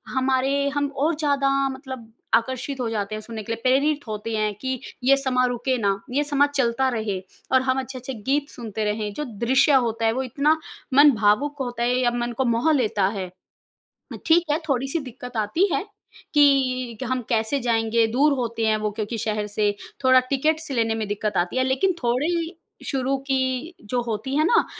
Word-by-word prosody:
हमारे 270 +2 +1
हम 285 0 +1
और 310 +3 +1
ज़्यादा 285 -3 +1 0.2
मतलब 260 -4 -8 0.2
आकर्षित 260 +3 0
हो 235 -2 -1
जाते 215 -1 -3
हैं 215 - -5
सुनने 225 -1 -7
के 225 - -6
लिए, 230 - -7
प्रेरित 280 +1 +2
होते 215 +1 -4
हैं 215 -1 0
कि 260 -2 -2 0.2
ये 275 +2 +6
समाँ 255 -2 +1
रुके 245 +1 -1
ना, 200 -3 0
ये 290 +3 +1
समाँ 285 0 +3
चलता 260 0 +2
रहे। 215 -5 -2 0.3
और 260 0 +5
हम 260 0 +1
अच्छे-अच्छे 260 0 -6
गीत 275 +6 -1
सुनते 220 -2 -5
रहें, 210 0 -2
जो 300 - -4
दृश्य 255 +5 +2
होता 225 0 -2
है 225 - +4
वो 260 +2 -1
इतना 290 +5 +2 0.4
मन 285 +1 +8
भावुक 220 +8 +2
होता 240 -2 -3
है 245 +1 +2
या 240 -1 +2
मन 240 0 -2
को 265 - +1
मोह 235 +7 +2
लेता 215 -7 +1
है। 185 -2 -3 0.9
अ, - - -5
ठीक 335 +1 +5
है, 305 - +1
थोड़ी-सी 270 +4 0
दिक्कत 250 -3 -8
आती 220 - +2
है - - 0 0.5
कि 255 -5 +3
क - - -1
हम 255 -1 0
कैसे 225 +4 +1
जाएँगे, 230 -1 +2
दूर 280 +6 +3
होते 230 -2 -2
हैं 215 0 +3
वो 215 -1 -2
क्योंकि 215 +2 -4
शहर 210 -1 -2
से 205 0 +1 0.3
थोड़ा 260 0 +7
टिकट्स 310 +2 0
लेने 225 -3 +1
में 220 -2 -3
दिक्कत 205 0 -2
आती 175 +8 0
है। 260 - +3
लेकिन 270 +9 +1
थोड़ी 325 +8 0 0.3
शुरू 270 0 0
की 265 +5 -1
जो 245 -1 0
होती 235 +4 -3
है 310 - +4
ना 460 +3 +4
255 Hz, 195 wpm, -23 LUFS, 225-275 Hz, 0.9 s, मन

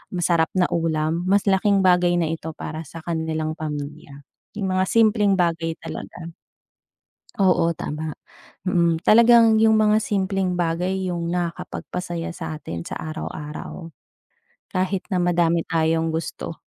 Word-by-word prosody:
masarap 170 -2 +2
na 180 -1 +4
ulam 165 +1 0
mas 200 +1 +3
laking 195 0 +3
bagay 180 -1 +4
na 165 -2 0
ito 160 -1 -5
para 155 -1 -6
sa 165 0 -10
kanilang 160 -2 -2
pamilya. 145 -1 -6 0.3
Yung 200 -2 -3
mga 185 0 +1
simpleng 215 -1 +3
bagay 165 -3 0
talaga. 170 -1 -7 1.1
Oo 180 -3 +3
tama, 155 -1 -4 0.6
mm, 170 -3 +2
talagang 230 0 +7
yung 220 -1 +5
mga 215 0 +3
simpleng 195 -2 0
bagay 180 +3 -1
yung 170 -1 -2
nakakapagpasaya 175 0 -4
sa 155 -1 -5
atin 85 - -6
sa - - -6
araw-araw. 155 +1 -6 0.8
Kahit 185 +1 -1
na 185 - +1
madami 170 -1 +2
tayong 160 0 +1
gusto. 160 0 -5
170 Hz, 130 wpm, -23 LUFS, 160-190 Hz, 1.1 s, talagang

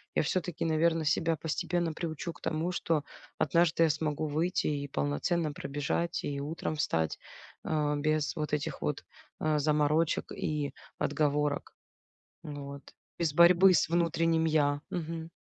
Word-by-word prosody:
я - - +3
всё-таки, 175 +1 -2
наверно, 165 0 +2
себя 165 +1 +2
постепенно 170 +2 -1
приучу 160 +1 -4
к - - -17
тому, 160 +3 -1
что 165 -4 0 0.3
однажды 170 -1 +3
я 165 - +4
смогу 155 0 -1
выйти 160 +5 0
и 145 -1 -1
полноценно 75 - 0
пробежать, 145 +4 -2
и 140 -1 -3
утром 155 +2 -3
встать, 80 - 0 0.4
а, 150 -2 0
без 155 0 0
вот 150 -1 -3
этих 150 0 -2
вот, 150 - -2 0.4
а, 155 -1 +1
заморочек 150 +2 +1
и 145 -3 -2 0.2
отговорок. 145 -1 0 0.7
Вот. 140 -1 -7 0.4
Без 165 -3 +1
борьбы 180 +3 +7
с - - +3
внутренним 165 -1 +2
"я". 145 -2 +2
Мгм. 165 -1 -4
155 Hz, 135 wpm, -30 LUFS, 145-165 Hz, 0.7 s, борьбы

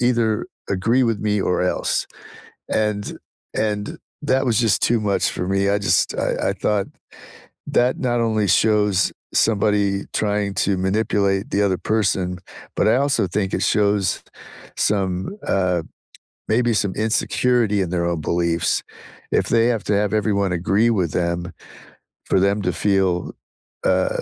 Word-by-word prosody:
either 120 -3 +1 0.2
agree 115 +7 +2
with 115 -3 0
me 105 -1 0
or 90 -1 0
else, 90 - 0 0.6
and 105 -1 -1 0.4
and 105 -1 -2 0.2
that 135 -2 +1
was 115 -3 +2
just 115 -3 +2
too 120 -1 +2
much 100 -2 +1
for 90 - -4
me, 95 0 +1
I 100 +1 +2
just 95 -3 +1
I - - 0
I - - 0
thought 105 -2 0 0.8
that 125 +1 +1
not 120 -2 0
only 110 -2 +1
shows 105 0 +3 0.2
somebody 100 -2 +1
trying 105 -1 0
to 100 -1 +1
manipulate 100 0 0
the 100 - +1
other 95 -2 +1
person, 95 -4 0 0.4
but - - +2
I 115 - +4
also 140 -6 +1
think 95 +1 -1
it 95 - -1
shows 100 -2 +1 0.5
some, 95 - -1
uh, 90 -3 +1 0.7
maybe 120 +1 +2
some 100 -3 0
insecurity 110 0 +1
in 90 - -2
their 85 -1 -1
own 85 -2 -1
beliefs. 85 +1 0 0.5
If - - +2
they 115 0 +3
have 115 -4 0
to 105 - 0
have 105 0 +1
everyone 100 -3 +1
agree 95 +6 +2
with 95 -9 0
them 85 0 -2 0.7
for - - +2
them 100 +2 +2
to 90 - 0
feel, 95 0 0 0.5
uh, - - +2
100 Hz, 150 wpm, -21 LUFS, 95-110 Hz, 0.8 s, I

